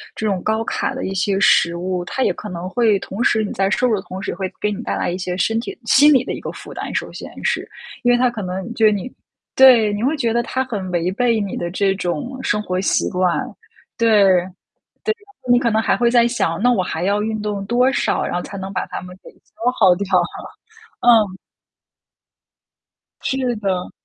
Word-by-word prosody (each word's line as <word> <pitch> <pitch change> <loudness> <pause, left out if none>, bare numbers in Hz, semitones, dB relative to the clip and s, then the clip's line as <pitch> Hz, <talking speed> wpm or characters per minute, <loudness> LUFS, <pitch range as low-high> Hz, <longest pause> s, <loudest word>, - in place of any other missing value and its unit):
这 220 - -4
种 195 -3 -1
高 220 +1 0
卡 - - -2
的 - - -4
一 190 - -3
些 195 +1 0
食 170 -3 +4
物， 180 0 -3
它 260 +8 -2
也 - - +2
可 210 - -8
能 175 0 -5
会 220 -1 +2
同 200 +6 -4
时 220 -2 +2
你 205 - -4
在 195 0 +1
摄 250 +4 +1
入 215 -4 +1
同 190 +1 -8
时， - - -3
会 185 0 -4
给 210 - 0
你 205 +3 -5
带 - - -2
来 - - -1
一 180 - -3
些 180 -1 -4
身 225 +4 +1
体 235 - -6
心 280 +5 +6
理 260 -3 +4
的 - - -4
一 - - -5
个 - - -5
负 - - -11
担， - - -6
首 - - -3
先 - - -8
是。 - - -1 0.3
因 245 - +4
为 245 - +4
它 250 0 +3
可 235 -3 -6
能 190 +4 -5
对 220 -2 +4
你 205 +4 -3 0.4
对， 240 -6 +6
你 205 - -3
会 295 +4 +1
觉 235 -4 0
得 235 - +2
它 260 +2 -2
很 210 -7 -5
违 175 0 0
背 230 +2 +1
你 200 -2 -3
的 175 - -3
这 195 +2 +1
种 185 - -4
生 210 - 0
活 185 -1 -2
习 - - +1
惯， 180 -2 +1 0.6
对， 230 -1 +2 0.9
对 - - -1
啊， 410 -2 -27 0.2
你 245 - +6
可 240 -2 +1
能 220 - +2
还 - - +1
会 240 -1 +2
在 240 -1 +4
想， 170 -8 -1
那 245 - +4
我 210 -6 +2
还 170 -1 -3
要 205 +2 +1
运 220 0 -2
动 205 -2 -3
多 245 +5 +2
少， - - 0
然 - - -3
后 175 - -1
才 200 - -8
能 190 0 -6
把 - - -2
它 - - -6
们 180 0 -11
给 - - -13
消 245 +2 -4
耗 185 -1 +6
掉？ 200 +1 -3 0.9
嗯。 215 -6 +4 1.8
是 260 -2 -1
的。 190 -3 -2
210 Hz, 240 characters per minute, -20 LUFS, 185-240 Hz, 1.8 s, 心